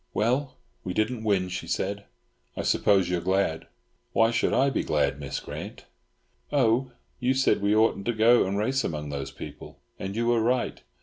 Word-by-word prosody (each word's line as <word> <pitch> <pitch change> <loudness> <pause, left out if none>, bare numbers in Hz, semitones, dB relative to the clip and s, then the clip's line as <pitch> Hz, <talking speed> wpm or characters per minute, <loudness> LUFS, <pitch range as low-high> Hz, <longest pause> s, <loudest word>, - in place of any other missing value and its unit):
"Well, 130 +5 0 0.3
we 90 - -4
didn't 110 +1 0
win," 100 -4 +1
she 90 - -5
said. 100 +1 -2 0.5
"I - - -2
suppose 95 -3 +3
you 90 0 0
are - - -8
glad." 95 -2 0 0.5
"Why 115 0 +4
should 115 - +1
I 135 +1 +3
be - - 0
glad, 70 - 0
Miss 70 -2 -4
Grant?" - - -8 0.7
"Oh! 130 -2 +2 0.3
you 130 +1 +1
said 130 -5 +2
we 100 +1 +2
oughn't 110 -2 +2
to 120 - +2
go 115 0 +4
and 100 +1 -1
race 130 +6 0
among 75 -2 -3
those 70 -1 -4
people. - - -10 0.2
And 95 +1 -5
you 115 +1 0
were 120 -1 +3
right. 125 +2 0
110 Hz, 185 wpm, -26 LUFS, 95-120 Hz, 0.7 s, Why